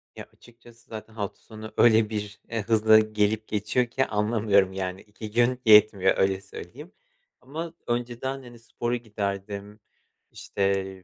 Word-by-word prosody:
Ya, - - -8
açıkçası 120 -1 -19
zaten 110 0 -9
hafta 100 -2 -5
sonu 110 -1 -10
öyle 110 -2 +5
bir, 105 -1 -5
eee, 115 -1 -2
hızla 110 0 +5
gelip 110 0 0
geçiyor 110 +4 0
ki 130 +3 -1
anlamıyorum, 105 -3 +2
yani, 95 0 -4
2 105 0 -10
gün 120 +2 +2
yetmiyor 105 -3 +6
öyle 95 0 +1
söyleyeyim. 100 - -11 0.5
Ama 165 +4 -6
önceden, 120 +3 -3
hani, 120 -1 -13
spora 120 +1 -3
giderdim, 105 -2 -5 0.5
işte, 95 -1 -2
110 Hz, 135 wpm, -26 LUFS, 100-120 Hz, 0.5 s, yetmiyor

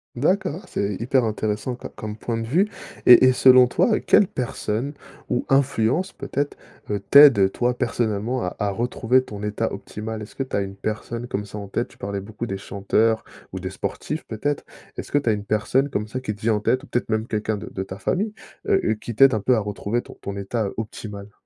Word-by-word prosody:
D'accord, 180 +6 0
c'est 100 0 -2
hyper 125 +2 +2
intéressant 110 +2 -2
co - - -8
comme 105 0 -7
point 115 +1 -3
de 115 - -3
vue 170 - +2 0.4
et 125 +1 +9
et - - +6
selon 130 0 +7
toi, 215 - +2
heu, - - 0
quelle 205 - +5
personne 125 -1 -3 0.4
ou 125 - 0
influence 135 +6 +2
peut-être, 140 +1 -3 0.3
heu, 105 -1 0
t'aide 125 -5 +7
toi 125 0 +1
personnellement 120 0 -1
à 90 - -2
à 105 -1 0
retrouver 120 +4 +1
ton 105 -4 -8
état 105 +2 -2
optimal? 110 +2 -6
Est-ce 105 - -10
que 135 - -1
tu 130 - -14
as - - +2
une 95 0 -5
personne 115 +3 -4
comme 105 -2 -3
ça 105 - -9
en 100 - -8
tête? 120 +4 -1
Tu - - -20
parlais 100 0 -4
beaucoup 105 +4 -6
des 95 -4 -4
chanteurs 105 +3 +1 0.3
ou 95 - -5
des 95 - -3
sportifs 150 +10 -4
peut-être. 140 +6 -2 0.3
Est-ce - - -7
que - - +5
tu 140 -5 +1
as - - +5
une 105 -1 -4
personne 110 +7 +1
comme 105 -4 -3
ça 130 - -3
qui 110 -5 -4
te - - -19
vient 110 0 +2
en 105 - 0
tête, 130 +5 +1
ou - - -12
peut-être 120 - -1
même 110 0 0
quelqu'un 110 -1 -1
de 100 - -7
de 95 - -3
ta 95 0 -8
famille? 205 - -1 0.3
Heu, 190 - +3
heu, 110 - +2
qui 115 +1 -7
t'aide 135 +3 +7
un 110 - +1
peu 125 +5 +3
à 110 - +2
retrouver 105 +3 -2
ton - - -13
ton 100 0 -5
état, 100 +3 -2
heu, 100 - -4
optimal? 105 -2 -7
110 Hz, 230 wpm, -23 LUFS, 105-130 Hz, 0.4 s, et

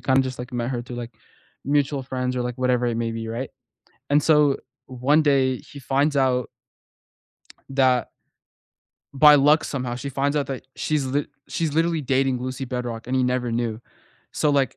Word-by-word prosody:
kind 130 0 +2
of 135 - +3
just 130 -1 -5
like 125 +2 -7
met 120 0 -2
her 120 -2 -3
through, 125 0 -8
like, 120 -2 -7 0.5
mutual 140 -1 +1
friends 130 -1 -3
or 125 - 0
like 120 0 -4
whatever 125 -1 +1
it 120 -1 -1
may 115 -1 -1
be, 115 0 -5
right? 120 +4 -4 0.6
And 145 +1 +4
so 150 -3 +4 0.3
one 130 +5 +2
day 135 -3 +3
he 140 - -12
finds 140 +3 +1
out 130 -3 +2 1.3
that 130 -2 +2 1.1
by 150 +1 +8
luck 145 +3 +5
somehow, 125 -3 -3
she 135 +3 -5
finds 140 +2 -1
out 145 - 0
that 130 -1 -5
she's 150 -3 -1
li 140 +2 0 0.2
she's 160 -3 -1
literally 165 +1 +1
dating 135 -1 +1
Lucy 130 +1 -4
Bedroque 120 -2 -4
and 130 - -2
he 130 - +2
never 125 -1 0
knew. 115 -2 -2 0.5
So 150 - +1
like 140 -3 +1
130 Hz, 185 wpm, -23 LUFS, 125-140 Hz, 1.3 s, by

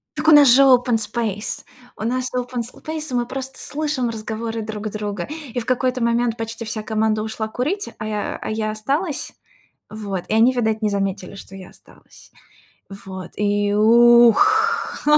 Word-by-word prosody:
Так 305 +1 -3
у - - +8
нас 295 -3 +8
же 260 +3 +7
open 250 -3 +4
space, 215 -1 -2 0.3
у - - -6
нас 255 +3 -1
open 250 -1 -2
space, 310 -2 -5
и - - -5
мы 240 -1 0
просто 265 +1 -6
слышим 290 -5 -2
разговоры 225 0 -4
друг 215 0 -5
друга, 205 -3 -4 0.3
и 245 - -1
в 230 - -6
какой-то 255 0 0
момент 235 0 +1
почти 225 0 -5
вся 215 0 -4
команда 215 0 0
ушла 220 0 -4
курить, 305 - -2
а 215 - -6
я, 210 -1 -2 0.2
э, - - -9
а - - -4
я 215 0 -2
осталась. 275 - -2 0.6
Вот, 200 -4 -5
и - - 0
они, 225 +3 +5
видать, 220 -3 0
не 215 - +1
заметили, 195 -1 -3
что 195 -1 -11
я 190 -1 -10
осталась. - - -20 0.7
Вот, 185 -2 -8
и 205 0 +1
ух, 240 - +4
230 Hz, 175 wpm, -21 LUFS, 215-255 Hz, 0.7 s, у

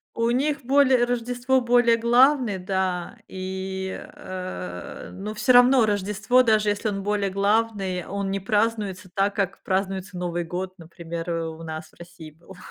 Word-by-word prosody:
У 230 0 +1
них 280 +2 0
более 265 -2 +4
Рождество 245 +2 0
более 240 -1 +4
главный, 240 -1 +3
да, 185 +2 -2
и, 190 0 -5 0.2
э, 90 - -7
ну, 205 +3 -6
всё 245 +4 +3
равно 245 -1 +6
Рождество, 210 +4 +2
даже 215 -3 +3
если 205 +2 -1
он 195 -1 -3
более 205 -1 0
главный, 200 -2 0
он 200 0 -3
не 195 0 -2
празднуется 205 -2 -1
так, 200 +1 +1
как 195 -2 -2
празднуется 190 -1 -2
Новый 175 -1 -2
год, 185 +2 -5
например, 170 0 -7
у 165 -1 -4
нас 160 -1 -7
в - - -25
России 170 -2 -11
был. 170 +4 -16
195 Hz, 150 wpm, -24 LUFS, 185-230 Hz, 0.2 s, равно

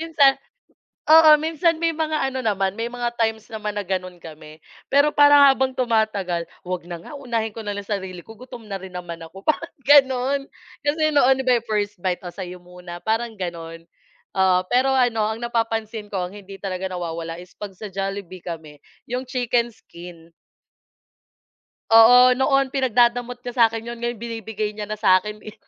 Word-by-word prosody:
Minsan 295 -4 +4 0.7
oo, 315 0 +7
minsan 320 +2 0
may 330 0 0
mga 310 -4 -1
ano 260 - -3
naman, 195 -4 0
may 235 - -1
mga 240 -1 -3
times 220 -1 0
naman 210 -1 -5
na 205 - -2
gano'n 185 -1 -4
kami, 155 -2 -12 0.3
pero 285 +2 +3
parang 290 -1 +7
habang 265 -1 -1
tumatagal, 215 -8 0 0.2
"Huwag 180 -1 -5
na 175 - -5
nga, 170 - -12
unahin 235 -6 -3
ko 225 - -8
na 205 -1 -4
lang 205 - -6
sarili 190 -4 -5
ko 225 - -12
gutom 245 -1 -11
na 195 -3 -6
rin 190 -1 -10
naman 170 -2 -7
ako," 165 +4 -12
parang 335 +2 -1
gano'n. 275 0 +4 0.3
Kasi 310 +1 +1
noon, 265 -2 +5
'di 265 - -3
ba, 250 - +4
'yong 230 - -26
first 210 -1 -1
bite, 180 0 -2
o 175 - -7
sa'yo 180 -1 -7
muna, 180 -1 -10
parang 225 0 -1
gano'n. 165 -3 -7 0.5
Oo, 190 -1 +3
pero 255 +4 +2
ano, 240 -4 +2
ang 220 - -4
napapansin 225 -2 -2
ko 190 -3 -2
ang 180 - -11
hindi 200 -1 -11
talaga 190 -1 -4
nawawala 165 -2 -5
is 180 +1 -13
pag 205 -1 -7
sa 215 - -7
Jollibee 195 -2 -5
kami, 155 -4 -8 0.3
'yong 250 +1 -4
chicken 245 -1 0
skin. 170 -6 -14 1.6
Oo, 245 +3 +8
noon 275 0 +2
pinagdadamot 245 -1 +1
niya 245 0 -6
sa'kin 225 -1 +3
'yon 235 0 -6
ngayon 240 -1 -4
binibigay 220 -2 -4
niya 210 0 -6
na 215 - -4
sa'kin, 210 +1 +2
eh. 215 - -11
220 Hz, 180 wpm, -22 LUFS, 185-255 Hz, 1.6 s, Oo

